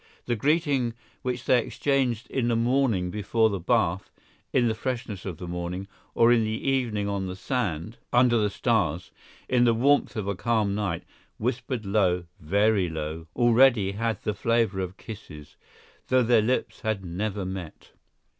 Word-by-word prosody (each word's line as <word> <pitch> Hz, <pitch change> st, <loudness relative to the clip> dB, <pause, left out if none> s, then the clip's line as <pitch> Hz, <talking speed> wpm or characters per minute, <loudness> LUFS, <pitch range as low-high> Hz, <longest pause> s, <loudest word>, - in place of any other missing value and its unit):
The 120 Hz, -, 0 dB
greeting 140 Hz, -3 st, +1 dB, 0.3 s
which 125 Hz, -1 st, -3 dB
they 125 Hz, -, +5 dB
exchanged 130 Hz, -5 st, 0 dB
in 125 Hz, -3 st, 0 dB
the 120 Hz, -, +2 dB
morning 115 Hz, -6 st, +1 dB
before 110 Hz, +2 st, +1 dB
the 100 Hz, -, -2 dB
bath, 95 Hz, -2 st, +1 dB, 0.4 s
in 120 Hz, -2 st, +3 dB
the 110 Hz, -, +1 dB
freshness 115 Hz, -4 st, -4 dB
of 90 Hz, -4 st, -5 dB
the 90 Hz, -, -7 dB
morning, 90 Hz, +2 st, -4 dB, 0.3 s
or 115 Hz, +1 st, +5 dB
in 115 Hz, -2 st, +4 dB
the 110 Hz, +4 st, -3 dB
evening 115 Hz, -6 st, 0 dB
on 100 Hz, -2 st, -2 dB
the 90 Hz, -, -5 dB
sand, 105 Hz, -, -3 dB
under 120 Hz, -1 st, +4 dB
the 105 Hz, -1 st, +2 dB
stars, 100 Hz, -, 0 dB, 0.4 s
in 125 Hz, -1 st, +3 dB
the 115 Hz, -1 st, +4 dB
warmth 140 Hz, +5 st, +2 dB
of 105 Hz, -3 st, -3 dB
a 100 Hz, -, 0 dB
calm 110 Hz, 0 st, 0 dB
night, 100 Hz, -5 st, -2 dB, 0.3 s
whispered 125 Hz, -1 st, -2 dB
low, 95 Hz, -3 st, +2 dB, 0.2 s
very 100 Hz, +3 st, +2 dB
low, 80 Hz, +1 st, -5 dB
already 120 Hz, -4 st, +4 dB
had 115 Hz, +2 st, -2 dB
the 105 Hz, -, -1 dB
flavor 115 Hz, -2 st, +1 dB
of 95 Hz, 0 st, -4 dB
kisses, 75 Hz, -9 st, -10 dB, 0.5 s
though 130 Hz, -1 st, +4 dB
their 115 Hz, -1 st, +4 dB
lips 125 Hz, +4 st, -1 dB
had 110 Hz, -4 st, -2 dB
never 100 Hz, +3 st, -3 dB
met. 90 Hz, -4 st, -7 dB
110 Hz, 165 wpm, -26 LUFS, 95-120 Hz, 0.5 s, they